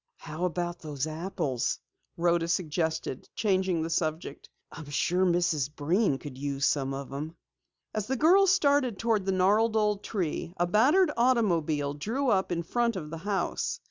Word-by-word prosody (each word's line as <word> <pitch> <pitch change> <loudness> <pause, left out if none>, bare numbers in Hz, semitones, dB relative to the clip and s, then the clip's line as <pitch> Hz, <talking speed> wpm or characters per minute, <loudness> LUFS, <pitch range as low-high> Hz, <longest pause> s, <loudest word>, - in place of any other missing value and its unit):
"How 160 +3 -4
about 175 0 -2
those 145 -3 -4
apples?" 155 -5 -2 0.4
Rhoda 170 0 +2
suggested, 160 -5 -2
changing 185 -5 +1
the 165 - -3
subject. 155 -3 -3 0.2
"I'm 155 -3 -10
sure 180 +6 +1
Mrs. 170 -6 +1
Breen 165 +1 +1
could 135 -2 -9
use 140 0 -1
some 135 -2 +1
of 135 0 -6
them." 150 +4 -5 0.6
As 215 -2 -3
the 265 +1 -1
girls 370 +7 +5
started 285 - +2
toward 220 -3 0
the - - +2
gnarled 210 +4 +3
old 210 -2 +1
tree, 180 -3 -3
a 175 - +2
battered 265 - +4
automobile 170 - +1
drew 230 - -2
up 190 -2 +1
in 170 -1 -1
front 235 +5 0
of 155 -5 -6
the 165 - -5
house. 195 +2 -2
175 Hz, 160 wpm, -28 LUFS, 155-215 Hz, 0.6 s, girls